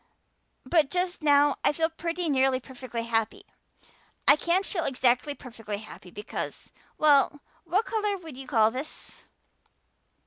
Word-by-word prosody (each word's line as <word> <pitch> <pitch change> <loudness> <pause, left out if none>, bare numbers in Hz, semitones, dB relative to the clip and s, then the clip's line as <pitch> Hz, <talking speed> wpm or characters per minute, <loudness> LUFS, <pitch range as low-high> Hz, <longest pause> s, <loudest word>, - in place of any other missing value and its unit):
But 300 +1 +3
just 360 +2 -1
now 290 -1 +4
I - - +4
feel 320 +2 +1
pretty 335 +1 -3
nearly 265 -2 +2
perfectly 255 -2 -6
happy. 225 -1 -1 0.8
I 285 - +9
can't 345 +5 +1
feel 340 -4 -2
exactly 255 +1 +1
perfectly 225 -6 -7
happy 205 -3 -11
because 205 +4 -6 0.3
well, 290 -1 +4 0.2
what 380 +7 +1
color 420 -4 -1
would 325 -6 -10
you 265 0 -9
call 220 -3 +3
this?" 265 +6 -8
285 Hz, 135 wpm, -27 LUFS, 250-335 Hz, 0.8 s, I